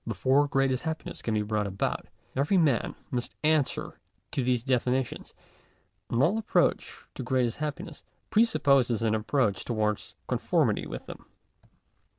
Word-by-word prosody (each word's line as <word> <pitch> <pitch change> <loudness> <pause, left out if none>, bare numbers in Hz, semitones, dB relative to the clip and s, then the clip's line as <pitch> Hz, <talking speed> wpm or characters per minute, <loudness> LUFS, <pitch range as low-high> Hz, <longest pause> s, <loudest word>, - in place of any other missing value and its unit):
Before 130 +7 +2
greatest 135 -2 +1
happiness 160 0 -5
can 110 - -1
be 105 - +1
brought 105 -1 -1
about, 95 0 -2 0.3
every 145 +9 +2
man 145 - +2 0.2
must 120 -1 -3
answer 155 -3 +1 0.3
to 135 - -1
these 125 -2 +1
definitions; 130 0 -1 0.7
and 120 +3 +2
all 200 +9 +3
approach 220 - 0
to - - -6
greatest 125 -1 0
happiness, 150 +1 -5 0.3
presupposes 140 - +3
an 110 -1 +2
approach 110 -1 +1
towards 105 -3 -1
conformity - - +1
with - - -7
them. - - -10
130 Hz, 135 wpm, -28 LUFS, 115-145 Hz, 0.7 s, all